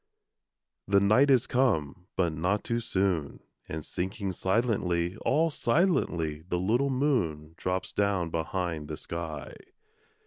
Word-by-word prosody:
The 100 0 +5
night 110 +8 +4
is 130 -4 +5
come, 90 - 0
but 85 -4 +1
not 90 +6 0
too 115 0 -1
soon; 95 -9 -1 0.3
And 80 -1 -5
sinking 95 +2 -3
silently, 95 -3 0
All 160 +7 +2
silently, 115 - +1
the 90 - 0
little 115 +10 +1
moon 100 - 0
Drops 90 +1 -3
down 100 -5 +1
behind 80 -2 -2
the 75 -1 -5
sky. 80 -4 -6
95 Hz, 125 wpm, -29 LUFS, 80-115 Hz, 0.3 s, The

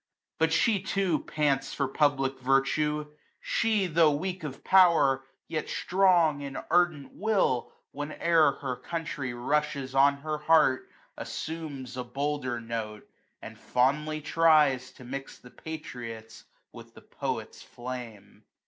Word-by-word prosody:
But 160 0 +3
she 210 +2 +2
too 190 -6 0
pants 145 -3 0
for 140 - 0
public 135 -1 +1
virtue; 150 +3 +1 0.3
she, 220 -4 +1
Tho' 165 -2 +4
weak 180 +5 -3
of 140 -3 -7
power, 165 -8 +5 0.2
yet 155 -2 -3
strong 175 -6 +3
in 140 -1 -6 0.2
ardent 175 -5 +2
will. 200 - 0 0.2
Whene'er 155 +1 +2
her 130 -3 -3
country 155 -6 -4
rushes 140 +1 -1
on 140 +1 +4
her 155 0 -3
heart, 150 -4 +3 0.3
jao - - -7
Assumes 145 -6 -6
a 125 - -2
bolder 130 -1 -2
note; 115 -2 -6 0.4
and - - -10
fondly 150 +5 0
tries 150 -5 +3
To - - -14
mix 135 +2 -7
the 125 - -16
patriot's 115 -8 -8 0.3
with - - -13
the - - -13
poet's - - -5
flame. 120 -5 -9
145 Hz, 130 wpm, -28 LUFS, 130-160 Hz, 0.4 s, power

